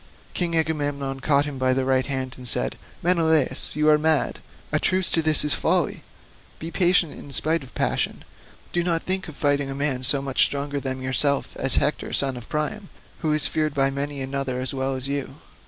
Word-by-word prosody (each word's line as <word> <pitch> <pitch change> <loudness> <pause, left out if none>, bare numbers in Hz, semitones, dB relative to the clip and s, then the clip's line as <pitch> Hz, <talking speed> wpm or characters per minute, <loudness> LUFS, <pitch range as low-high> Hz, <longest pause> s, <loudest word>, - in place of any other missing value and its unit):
King 170 -2 -1
Agamemnon 145 -4 -2
caught 140 +1 +2
him 145 -3 -6
by 130 0 +2
the 130 0 0
right 130 -1 +1
hand 130 -2 -2
and 125 -1 -8
said, - - 0 0.3
"Menelaus, 160 -5 +1
you 150 0 +1
are 150 0 +5
mad; 155 -1 +1 0.3
a - - +2
truce 185 -1 +2
to 165 - +3
this 155 -1 +7
folly. - - 0 0.6
Be 165 +1 -7
patient 175 -3 +2
in 140 - -11
spite 160 +3 0
of 130 -3 -14
passion, - - -1 0.5
do 175 - +1
not 170 -1 -1
think 185 0 -2
of 160 - -9
fighting 145 -1 0
a 135 - -4
man 140 -2 -1
so 135 +2 +2
much 135 -1 +2
stronger 140 0 -1
than 130 -1 -4
yourself 140 +2 +1
as 135 - +1
Hector 150 - 0
son 135 -2 +4
of 120 -2 -10
Priam, 190 +7 -3 0.3
who 155 - -1
is 150 -1 +1
feared 155 -2 -1
by 135 -1 +2
many 140 0 -4
another 135 -1 -3
as 130 +1 -2
well 135 0 -2
as 130 0 -3
you. 140 -1 -4
140 Hz, 200 wpm, -23 LUFS, 135-160 Hz, 0.6 s, this